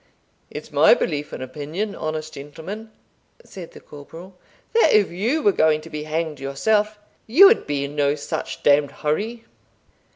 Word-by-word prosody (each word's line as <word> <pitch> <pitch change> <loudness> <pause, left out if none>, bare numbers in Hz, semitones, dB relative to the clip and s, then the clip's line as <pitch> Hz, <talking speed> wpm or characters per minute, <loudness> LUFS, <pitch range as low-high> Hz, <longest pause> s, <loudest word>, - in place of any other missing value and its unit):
"It's - - -9
my - - +6
belief 150 - -3
and - - -6
opinion, 155 +10 -5
honest 155 -2 -5
gentleman," 165 +10 -9 0.6
said 180 -4 -11
the - - -12
corporal, 165 +6 -12 0.4
"that 460 - +4
if 210 -2 +3
you 235 - -1
were 205 - +5
going 155 -4 +2
to 165 - -13
be 150 -1 -5
hanged 155 -1 -3
yourself, 210 +11 0 0.3
you 305 - +7
would 435 +4 +4
be 145 -1 -1
in 145 +1 -8
no 145 0 +1
such 145 - -5
d 145 0 +6
d 145 - -8
hurry." 215 +13 -3
160 Hz, 165 wpm, -22 LUFS, 145-210 Hz, 0.6 s, you